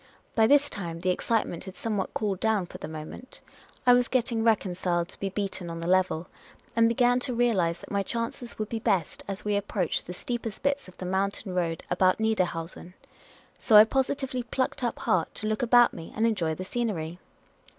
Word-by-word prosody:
By 220 -1 +4
this 285 +2 +5
time 170 -9 -5
the 185 0 +2
excite 225 +4 +1
ment 170 - -6
had 190 -1 -9
somewhat 210 -4 -2
cooled 200 -4 -1
down 220 -4 +1
for - - -11
the - - -6
moment; 155 +10 -9 0.5
I 245 - +8
was 245 -1 +4
getting 235 -3 0
reconciled 180 -5 +1
to - - -14
be 195 - -2
beaten 195 -3 -4
on 165 0 -5
the 165 - -5
level, 180 -2 +2 0.5
and 230 0 +5
began 245 +1 +3
to 250 -1 -2
realise 195 -9 +2
that - - -11
my 200 -1 +1
chances 235 +4 -4
would 215 - -2
be 230 - -2
best 200 -7 0
as 200 +1 -5
we 210 -1 +1
approached 200 -3 -1
the 180 - -5
steepest 230 +3 -5
bits 280 -3 0
of 185 - -15
the 185 - -6
mountain 190 +1 -1
road 170 -3 -1
about 185 +2 +3
Niederhausen. 180 -5 -2 0.6
So 220 - +3
I 210 - +12
positively 265 +1 -1
plucked 255 +2 -2
up 240 - -1
heart 170 -3 0
to - - -4
look 215 0 0
about 240 0 +5
me 165 - -9
and 220 - +2
enjoy 175 -9 +1
the 185 - -6
scenery. 185 -7 -3
205 Hz, 200 wpm, -27 LUFS, 180-235 Hz, 0.6 s, I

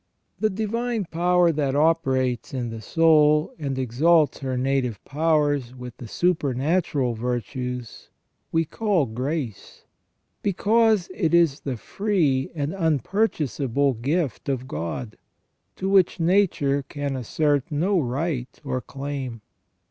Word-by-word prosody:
* - - -46
The 215 - +2
divine 220 +2 -2
power 175 +1 +3
that 145 -3 -1
operates 135 -6 +1
in 120 -3 -3
the 115 -1 -7
soul, 150 +1 +4
and 140 -3 -3
exalts 145 +6 +3
her 130 -2 -3
native 130 -3 0
powers 145 -4 +1
with 125 -1 -9
the 120 - -8
supernatural 145 - 0
virtues, 125 +1 -4 0.4
we 165 0 +2
call 200 -3 +1
grace, 125 -1 -5 0.6
because 215 0 +2
it 170 -4 +1
is 165 -4 +3
the 130 -4 -4
free 155 - 0
and 145 0 -2
unpurchasable 150 - 0
gift 145 -1 -1
of 130 -1 -2
God, 85 +6 -5 0.6
to 190 - -3
which 195 -2 +3
nature 165 -6 +2
can 140 0 -4
assert 145 +4 0
no 180 +6 +1
right 135 -1 -3
or 130 - -2
claim. 135 -4 -6
145 Hz, 120 wpm, -24 LUFS, 130-170 Hz, 0.6 s, soul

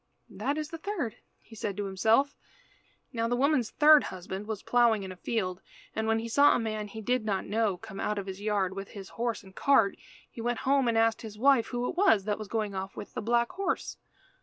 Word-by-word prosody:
"That 265 +9 -2
is 305 0 -3
the 330 -1 -7
third," 325 - -3 0.4
said 210 -2 -4
he - - -19
to 205 - -2
himself. 220 +9 +2 0.8
Now 230 -1 0
the 245 - +1
woman's 260 -2 +2
third 305 0 +6
husband 190 +2 -6
was 220 -3 -4
ploughing 235 -4 +3
in 190 - -6
a - - -8
field, 185 -2 -2 0.3
and 220 0 -1
when 225 0 +3
he 225 +1 -3
saw 285 +5 +5
a - - +1
man 215 -2 -3
he 220 +2 -8
did 250 +2 0
not 200 -3 -1
know 210 -2 0
come 195 +2 -9
out 210 - -1
of 200 - -3
his 190 0 -7
yard 200 -3 0
with 195 0 -5
his 195 -2 -10
horse 235 -2 -3
and 190 -1 -16
cart, 225 -8 +3 0.3
he 230 - -9
went 240 0 -1
home 270 -1 +2
and 230 -1 +2
asked 225 0 +2
his 215 -3 -9
wife, 260 -1 +4
who 245 0 -2
it - - -4
was 345 - +4
that 210 +1 -2
was 215 - -6
going 215 -1 -2
off 190 0 -5
with 205 - -8
the - - -3
black 235 +2 +1
horse. 390 +1 -2
220 Hz, 235 wpm, -29 LUFS, 200-245 Hz, 0.8 s, third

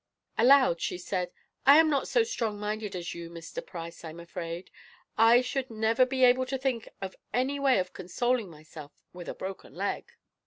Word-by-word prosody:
Aloud 255 -7 +5
she - - -2
said: 180 0 -3 0.3
"I 280 +2 +8
am 320 0 +6
not 285 -3 +1
so 470 - +3
strong 230 - -3
minded 210 -1 -3
as 175 -1 -4
you, 170 -1 -7
Mr. 165 -1 -7
Price, 170 -1 -8
I'm 165 0 -8
afraid. 170 0 -6 0.4
I 230 +2 +6
should 260 +1 -3
never 225 +3 +2
be 260 0 0
able 255 +1 +5
to 265 +1 -2
think 260 -4 -2
of 190 - -5 0.2
any 265 +3 0
way 275 -2 +4
of 185 -1 -2
consoling 230 +4 -1
myself 155 -2 -12 0.2
for 180 - -9
a - - -5
broken 190 0 -7
leg." 475 - -3
220 Hz, 185 wpm, -29 LUFS, 175-255 Hz, 0.4 s, I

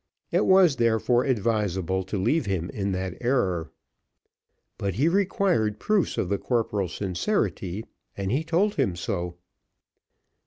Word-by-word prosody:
It - - +2
was 185 -7 +5
therefore 115 +1 +2
advisable 100 -6 0
to 100 +2 -3
leave 120 - +1
him 90 -3 -2
in 100 -1 -2
that 95 -1 -3
error. 95 -10 0 1.1
But 100 -3 -2
he 140 +9 +2
required 180 - +1
proofs 210 -5 +1
of - - 0
the 100 +1 -1
corporal's 105 -7 -1
sincerity, 100 - -2 0.3
and 100 -1 -2
he 140 +6 +1
told 180 +6 +1
him 120 -11 +1
so. 90 -2 -3
105 Hz, 130 wpm, -26 LUFS, 95-140 Hz, 1.1 s, was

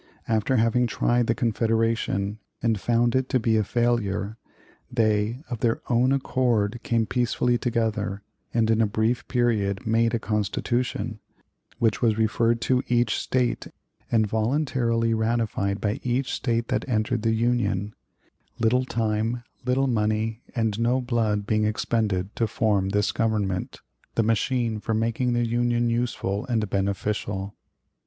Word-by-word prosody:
After 110 +3 +1
having 115 +1 +3
tried 120 0 +1
the 115 - +2
Confederation 115 -3 0 0.2
and 115 -3 +1
found 120 0 +2
it 130 0 +1
to 130 - +2
be 110 -1 +2
a 110 - +3
failure, 110 -3 0 0.6
they, 110 +2 +1
of 120 -3 -4
their 115 0 +1
own 125 +2 +3
accord, 120 -5 +1
came 115 -1 +1
peacefully 120 0 +1
together, 110 -4 -1 0.3
and 115 -1 +2
in 110 0 +3
a 110 - +3
brief 110 +3 0
period 105 -6 0
made 115 +1 +2
a - - 0
Constitution, 110 +2 -1 0.6
which 115 -2 +1
was 110 -2 +2
referred 115 +1 +2
to 130 -1 +2
each 120 -3 +2
State 125 -2 -1 0.4
and 110 -2 +3
voluntarily 115 0 +1
ratified 110 -3 0
by 105 0 -1
each 125 +2 -1
State 115 -2 -1
that - - -1
entered 110 0 0
the 110 0 +1
Union; 110 -4 0 0.6
little 125 +3 +2
time, 115 0 -1 0.2
little 130 +2 +2
money, 110 -1 0
and 110 -3 0
no 120 +3 +2
blood 115 -5 0
being 110 0 +1
expended 105 -3 -1
to 115 - +1
form 105 -4 +1
this 105 +1 +1
Government, 105 -5 -1 0.3
the 115 - +3
machine 115 0 0
for 110 +1 -2
making 115 +3 0
the 120 0 +1
Union 120 0 +1
useful 115 -4 -2
and 110 -4 0
beneficial. 100 0 -2
115 Hz, 140 wpm, -25 LUFS, 105-120 Hz, 0.6 s, having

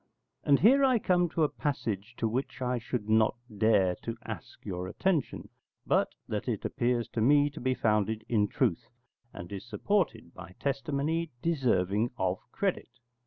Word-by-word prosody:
And 140 -1 +4
here 265 +8 +6
I 260 -2 +5
come 180 -4 +2
to 160 - 0
a - - +5
passage 120 -8 -3
to 115 - 0
which 125 +3 -3
I 125 -1 -1
should 120 -2 -4
not 110 0 +3 0.2
dare 100 -4 +3
to 115 0 -5
ask - - -8
your 90 -1 -4
attention, 160 - -1 0.4
but - - +1
that - - -3
it - - -2
appears 120 -1 0
to 115 - -2
me 145 +4 +4
to - - -9
be 130 +1 +1
founded 110 -1 0
in 105 -3 +2
truth, 105 -6 0 0.4
and 85 +2 -9
is 100 -1 -5
supported 120 - -1
by 95 0 -11
testimony 145 +4 -1
deserving 120 - +1
of 95 0 0
credit. 195 -8 -1
120 Hz, 165 wpm, -30 LUFS, 105-145 Hz, 0.4 s, here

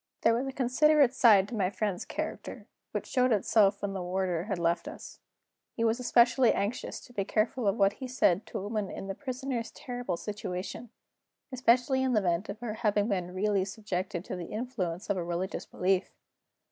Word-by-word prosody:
There 230 - +4
was 250 +4 -1
a - - -3
considerate 270 +1 +4
side 210 -7 +6
to 240 - -5
my 190 -4 +1
friend's 200 -2 -2
character, - - -5 0.3
which - - -3
showed 255 -1 +2
itself 205 -1 +3
when 200 -1 -1
the 190 - -3
warder 180 -1 -1
had 200 -3 -2
left 170 0 0
us. - - -9 0.5
He 230 - -2
was 230 +2 +2
especially 245 0 +4
anxious 205 +5 -3
to 245 - -16
be 200 - -1
careful 220 +3 0
of 200 +2 +2
what 195 0 +4
he 260 - -7
said 215 -6 +2
to - - -5
a - - -4
woman 210 -1 -2
in - - -6
the 195 - -3
Prisoner's 255 -1 -4
terrible 245 -8 -5
situation; 195 +2 -5 0.6
especially 255 +1 +3
in 260 -1 +1
the 215 - +4
event 180 0 0
of 205 +3 -6
her 235 -3 -3
having 210 -1 +1
been 180 -3 -2
really 200 0 +1
subjected 190 -3 -4
to - - -4
the 175 -2 -6
influence 210 -6 -4
of 195 - 0
religious 175 +2 -3
belief. 185 +1 0
210 Hz, 190 wpm, -29 LUFS, 190-245 Hz, 0.6 s, side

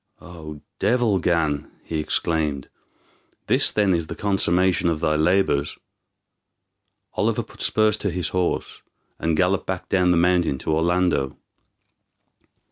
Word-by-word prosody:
"O 80 -4 -10 0.2
devil 115 -4 +2
Gan," 80 -4 0
he 80 - -4
exclaimed, 75 -3 -1 0.8
"this - - +4
then 100 -3 +1
is 85 -2 -1
the - - -6
consummation 95 -3 +1
of 80 -2 -1
thy 75 0 +1
labors!" 80 -3 +1 1.4
Oliver - - 0
put - - -15
spurs 110 -1 +2
to 100 - -2
his 90 0 -2
horse, 90 -1 -2 0.4
and 80 -1 0
galloped 95 +2 +1
back 95 -1 -4
down 90 -2 +2
the 90 - +3
mountain 85 -4 +2
to 80 - -2
Orlando. 85 -4 +1
85 Hz, 125 wpm, -23 LUFS, 80-95 Hz, 1.4 s, this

